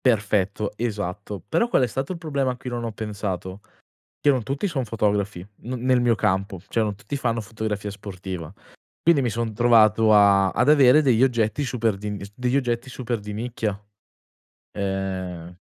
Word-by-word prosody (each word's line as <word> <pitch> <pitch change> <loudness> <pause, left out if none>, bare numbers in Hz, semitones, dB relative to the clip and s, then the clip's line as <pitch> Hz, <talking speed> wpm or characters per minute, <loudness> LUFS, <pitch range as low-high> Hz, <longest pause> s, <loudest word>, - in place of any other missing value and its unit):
Perfetto, 105 -3 +1
esatto. 105 -3 -4
Però 235 - +2
qual 235 - +3
è - - +2
stato 135 +7 -3
il 180 - -4
problema 140 -5 -1
a 125 - -7
cui 125 - -7
non 120 -1 -3
ho 115 - -3
pensato? 100 -3 -5 0.6
Che 145 - +3
non 130 -3 +3
tutti 140 - -2
son 135 -8 -2
fotografi, 105 -4 -1 0.2
n 125 - -5
nel 130 -1 +4
mio 120 -1 +3
campo; 95 -2 -1
cioè - - 0
non 105 -2 -1
tutti 105 +8 -5
fanno 115 -4 -1
fotografia 105 -1 -4
sportiva. 95 -4 -7 0.5
Quindi 165 -4 +4
mi 120 - 0
son 115 0 -3
trovato 110 -1 +5
a 100 -2 +5
ad 125 +7 +1
avere 145 -1 +7
degli 130 -5 +3
oggetti 120 0 +1
super 115 -5 0
d'ins 100 0 -6
degli 125 +3 0
oggetti 125 -1 -1
super 120 -2 -3
di 105 0 -7
nicchia. 110 -2 -3 1.0
Ehm 95 -3 -3
110 Hz, 170 wpm, -24 LUFS, 100-125 Hz, 1.0 s, avere